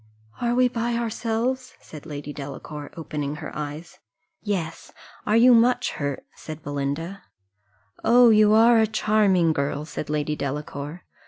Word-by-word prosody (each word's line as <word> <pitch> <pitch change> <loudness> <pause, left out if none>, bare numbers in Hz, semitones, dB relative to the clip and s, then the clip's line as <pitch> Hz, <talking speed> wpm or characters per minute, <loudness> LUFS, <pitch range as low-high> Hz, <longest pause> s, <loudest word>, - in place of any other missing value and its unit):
"Are 240 0 +1
we 255 0 +4
by 235 -1 -2
ourselves?" 235 +3 -2
said 155 0 -12
Lady 145 -1 -6
Delacour, 145 +1 -7
opening 150 -3 -4
her 155 0 -8
eyes. 155 +4 -7 0.4
"Yes 180 -6 -4 0.4
are 215 - +4
you 245 +2 +7
much 240 +2 +3
hurt?" 145 -2 -4
said 155 -1 -9
Belinda. 145 +7 -3 0.8
"Oh, 240 0 +6
you 215 -1 +5
are 230 +1 +6
a 220 - +4
charming 205 -6 +2
girl!" 145 +1 -2
said 150 -1 -6
Lady 150 0 -1
Delacour. 145 +3 -5
170 Hz, 140 wpm, -24 LUFS, 150-225 Hz, 0.8 s, you